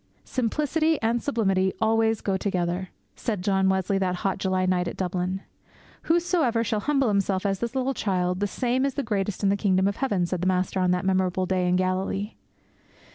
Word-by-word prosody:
'Simplicity 300 +5 0
and 230 +1 +1
sublimity 195 -8 +1
always 225 0 +2
go 195 - 0
together!' 185 -1 -1 0.3
said 210 -6 -3
John 190 -1 +2
Wesley 190 +1 +1
that 185 -1 0
hot 190 -1 0
July 185 -1 0
night 180 -1 +1
at - - -5
Dublin. 185 +1 -2 0.6
'Whosoever 325 -9 +2
shall 215 -1 -1
humble 275 +2 +1
himself 200 -1 0
as 195 -1 0
this 235 +3 -3
little 265 +1 0
child, 180 -5 -1
the 205 - +1
same 250 +5 0
is 275 -1 -1
the 280 - -1
greatest 205 -3 -2
in 200 - +4
the 200 - +3
kingdom 190 -1 +2
of 200 - -2
heaven!' 205 -10 0
said 175 0 -3
the 185 - 0
Master 185 +1 0
on 185 -1 +2
that 180 +1 +1
memorable 185 -1 +1
day 185 -1 0
in 180 - +3
Galilee. 185 +3 -1
195 Hz, 190 wpm, -25 LUFS, 185-230 Hz, 0.6 s, in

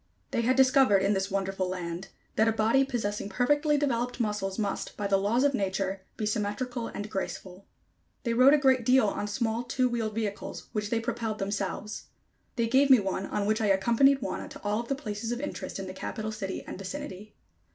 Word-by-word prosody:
They - - +1
had 250 +3 +2
discovered, 260 -6 +5
in 200 +2 +3
this 195 0 -1
wonderful 195 -1 -1
land, 180 0 -4 0.3
that 220 - +3
a - - +4
body 225 +5 +3
possessing 210 -6 -2
perfectly 290 +8 +2
developed 250 -3 -1
muscles 210 -4 -1
must, 205 -3 -3
by 205 - -3
the 200 0 +3
laws 220 +6 +2
of 285 -1 +3
nature, 195 -3 -1 0.2
be 215 - -2
symmetrical 230 +3 -2
and 205 +1 -5
graceful. 190 -1 -5 0.6
They 235 - 0
rode 255 +5 +7
a - - +4
great 265 -3 +3
deal 250 0 +5
on 205 0 -1
small, 225 +2 -1
two 250 +1 +1
wheeled 225 -3 -2
vehicles, 210 -3 -4
which 210 -1 -2
they 230 - +1
propelled 225 -1 -2
themselves. 200 +1 -3 0.5
They 235 - +1
gave 265 +4 +4
me 260 -3 +8
one 195 -1 -2
on 205 -1 -1
which 215 +2 +1
I 215 - +2
accompanied 235 +8 +4
Wauna - - -4
to 285 - -11
all 205 +1 0
of 235 - -5
the 275 - 0
places 225 -4 -4
of 240 - -2
interest 290 - -5
in 195 - -5
the 185 - -6
Capital 215 +3 -4
city 200 -3 -4
and - - -7
vicinity. 210 -2 -7
215 Hz, 205 wpm, -28 LUFS, 200-250 Hz, 0.6 s, me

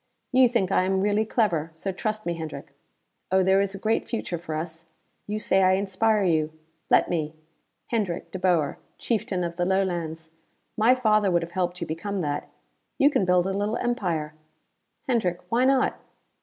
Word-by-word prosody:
"You 255 -1 +6
think 210 -6 0
I - - +4
am 190 0 +1
really 205 +2 +2
clever, 175 -9 0
so 190 +4 -3
trust 215 +3 -3
me, 170 - 0
Hendrick. 160 -2 -7 0.6
Oh 190 0 +4
there 190 +1 +4
is 200 0 -2
a - - -5
great 220 +3 0
future 185 -7 -3
for 160 -2 -5
us: 165 +1 -6 0.4
you 210 +1 -2
say 195 -2 +2
I 185 0 +5
inspire 200 +2 +1
you; 160 -4 +1 0.4
let - - +5
me! 155 -2 -2 0.6
Hendrick 200 -7 -2
De 185 - -5
Boer, 170 -6 +1 0.2
Chieftain 200 -5 -1
of 170 0 -4
the 175 - +1
Lowlands! 170 -4 -1 0.4
My 230 +4 +5
father 215 -5 +3
would 170 -2 +2
have 170 - -7
helped 180 0 -2
you - - -1
become 180 +6 -4
that. 145 -3 -3 0.5
You 285 +2 +5
can 195 - +2
build 180 -1 +3
a 195 - -1
little 205 +3 -1
empire. 175 -11 -1 0.7
Hendrick 200 -9 +1
why 245 +2 +3
not? 265 0 +2
190 Hz, 180 wpm, -25 LUFS, 170-215 Hz, 0.7 s, You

